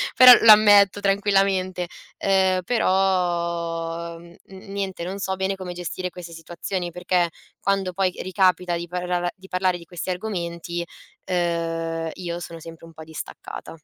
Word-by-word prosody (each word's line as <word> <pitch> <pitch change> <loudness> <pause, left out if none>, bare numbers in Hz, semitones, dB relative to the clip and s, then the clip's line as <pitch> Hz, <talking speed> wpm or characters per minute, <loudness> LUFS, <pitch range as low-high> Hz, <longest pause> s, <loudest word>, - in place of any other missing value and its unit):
però 255 -1 +10
lo 225 - +9
ammetto 205 -2 +6
tranquillamente. 195 -2 +1 0.3
Ehm, 190 -1 +2
però, 170 -5 0
n 170 0 -15
n 195 +1 -12
niente, 190 -3 -4
non 190 +3 -5
so 190 -1 -2
bene 190 +1 -1
come 185 -2 -7
gestire 180 +1 -5
queste 175 -2 -10
situazioni 175 +2 -5
perché 180 0 0 0.3
quando 195 -1 0
poi 190 0 +1
ricapita 185 -2 +1
di 170 0 -6
parlar 180 0 -2
di 190 0 -15
parlare 180 -1 +1
di 170 - -13
questi 175 +1 -6
argomenti, 175 -3 -4 0.4
uhm, 165 -2 -1
io 175 -2 -5
sono 165 -1 -8
sempre 165 0 -11
un 165 - -15
po' 160 - -10
distaccata. 160 +1 -8
180 Hz, 145 wpm, -23 LUFS, 170-190 Hz, 0.4 s, però